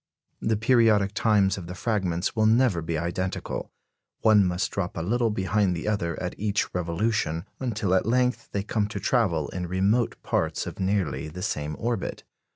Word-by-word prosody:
The 110 -1 +1
periodic 110 -3 +3
times 100 -3 +2
of 85 - -8
the 90 - -6
fragments 95 -4 -1
will 110 -1 +3
never 110 -6 +3
be 80 0 -2
identical; 85 +3 -3 0.5
one 110 -2 +6
must 90 0 0
drop 95 -3 -3
a 80 - -2
little 115 +5 +1
behind 95 -2 +1
the 85 - -4
other 85 -6 -1
at 90 0 -3
each 105 0 0
revolution, 90 0 -1
until 110 -7 -1
at 95 +2 +2
length 125 +1 +1
they 100 - -1
come 105 0 0
to 105 - -5
travel 90 - +1
in 90 -1 -4
remote 100 +6 +1
parts - - -1
of - - -7
nearly 95 -6 0
the 90 +4 -7
same 75 0 -2
orbit. 115 -4 -3
100 Hz, 170 wpm, -26 LUFS, 90-110 Hz, 0.5 s, one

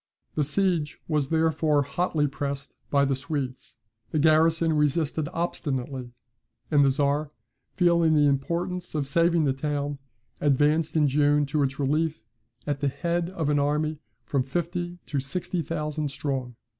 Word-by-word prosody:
The 150 - +1
siege 165 0 0
was 150 -4 0
therefore 160 -2 +2
hotly 150 +1 0
pressed 140 -1 -4
by 140 -1 +3
the 135 - +1
Swedes; 135 -2 -5 0.3
the - - -2
garrison 160 +1 +4
resisted 150 0 +1
obstinately; 135 -6 -3 0.6
and 145 -2 +5
the 140 - +5
Czar, 145 +2 +1 0.5
feeling 170 -3 +4
the 150 -1 +5
importance 170 +6 -1
of 145 -3 -1
saving 170 +3 +3
the 135 -3 +2
town, 145 0 -2 0.4
advanced 150 +3 +2
in 150 -2 +4
June 145 +1 +3
to 150 +1 0
its 135 -1 0
relief, 155 0 0 0.4
at 145 -1 -1
the 145 - 0
head 170 +5 -1
of 165 -5 -2
an 145 -1 +3
army 150 +1 0 0.3
from 130 +4 0
fifty 175 +5 -3
to 145 - -2
sixty 170 +6 -2
thousand 150 -2 -3
strong. 135 -3 -3
150 Hz, 145 wpm, -26 LUFS, 140-165 Hz, 0.6 s, and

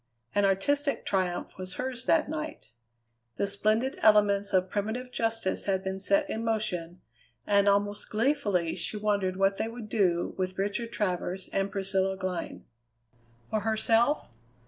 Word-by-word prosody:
An 205 0 +3
artistic 280 +10 +1
triumph 185 -2 -1
was 185 0 -6
hers 255 -1 -4
that 325 - +4
night. 310 - -5 0.7
The 200 - 0
splendid 215 +6 +1
elements 205 -2 +4
of 185 -1 +3
primitive 220 +6 -3
justice 225 -4 -1
had 190 -1 0
been 190 0 -3
set 300 +9 +2
in 225 -5 -3
motion, 180 -6 -1 0.4
and 200 0 +4
almost 205 +1 0
gleefully 215 - +1
she 215 - -3
wondered 200 -3 0
what 195 0 +2
they - - -1
would 230 -1 -8
do 180 -5 +1
with 185 0 -2
Richard 205 +4 -2
Travers 185 -3 -2
and 195 0 0
Priscilla 195 -1 0
Glynn. 185 -3 -4 0.9
For 215 - +1
herself? 225 - +2
205 Hz, 145 wpm, -29 LUFS, 190-225 Hz, 0.9 s, that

